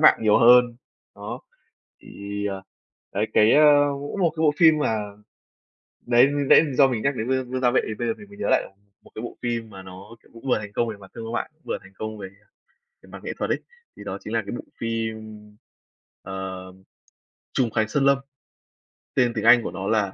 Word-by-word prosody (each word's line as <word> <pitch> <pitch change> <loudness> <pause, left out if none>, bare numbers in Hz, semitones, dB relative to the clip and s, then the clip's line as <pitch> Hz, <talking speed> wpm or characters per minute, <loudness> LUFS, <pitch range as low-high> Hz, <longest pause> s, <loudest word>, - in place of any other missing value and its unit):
mạn 155 - +6
nhiều 105 -1 +4
hơn, 120 0 +6 0.4
đó. - - -7 0.6
Thì, 100 0 -6
ờ, 95 -1 -4 0.5
đấy, 105 +2 0
cái, 110 +1 +5
ơ, 150 +1 +6 0.4
mỗi 145 +6 -6
một 175 -4 +2
cái 160 - -1
bộ 150 -2 +4
phim 160 -1 +6
mà 115 -7 0 1.1
đấy, 120 +1 +5
mình 145 -1 -2
nãy - - +8
do 135 0 +5
mình 120 -4 -2
nhắc 140 -1 0
đến 110 +1 -3
Vương 130 -1 -1
Vương 130 0 -2
Gia 125 -1 +3
Vệ 125 - +3
thì 110 - -3
bây 120 +2 -3
giờ 115 - 0
mình 205 - -13
mới 205 0 -15
nhớ - - -3
lại - - +3 0.4
một - - -19
cái 110 - -6
bộ 120 - -7
phim 115 -2 -3
mà 95 -2 -10
nó, 95 +4 -12
kiểu, - - -24
cũng 115 +3 -13
vừa 125 - +3
thành 105 -1 -8
công 120 +2 0
về 110 - -5
mặt 95 -2 -15
thương 115 -1 -7
mại, 120 - -3
vừa - - -3
thành 95 0 -17
công 110 +2 -6
về 95 -2 -7 0.8
mặt - - -11
nghệ - - -4
thuật - - -2
ấy. - - 0 0.4
Thì - - -10
đó - - -5
chính - - -6
là - - +1
cái - - -4
bộ - - -8
phim, 110 -2 -4 0.8
ờm, 95 0 -8 0.7
"Trùng 125 -4 +1
Khánh 110 -1 0
Sơn 135 +5 0
Lâm", 140 0 +5 1.0
tên 120 -1 +2
tiếng 110 - -2
Anh 120 0 +7
của - - -4
nó 95 +2 -5
là 105 -3 +1
115 Hz, 220 wpm, -24 LUFS, 105-130 Hz, 1.1 s, nãy